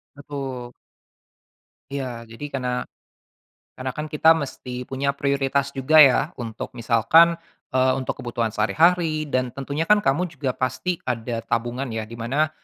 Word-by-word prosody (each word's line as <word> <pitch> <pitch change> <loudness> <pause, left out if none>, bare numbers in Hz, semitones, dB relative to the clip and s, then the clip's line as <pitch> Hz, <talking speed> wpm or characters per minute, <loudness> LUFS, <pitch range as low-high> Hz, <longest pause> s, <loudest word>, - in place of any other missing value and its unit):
Betul. 135 -4 -6 1.2
Iya. 130 -4 -4
Jadi, 140 +6 -8
karena 125 -2 -2 0.9
karena, 130 0 -3
kan 150 - -3
kita 160 +1 +5
mesti 125 -4 -5
punya 140 +2 -1
prioritas 140 0 0
juga 135 +3 +1
ya, 135 +1 +5
untuk 115 -2 -6
misalkan, 125 +9 +4 0.3
eee, 130 0 +3
untuk 130 - -3
kebutuhan 120 -2 -2
sehari-hari 155 +8 +2
dan 130 -2 +1
tentunya 140 +4 -3
kan 210 0 +5
kamu 145 +7 +2
juga 140 -4 -3
pasti 130 +8 -2
ada 115 -1 -2
tabungan 120 +3 -1
ya, 110 - -2
di 110 - -14
mana 140 +7 0
135 Hz, 140 wpm, -23 LUFS, 125-145 Hz, 1.2 s, kita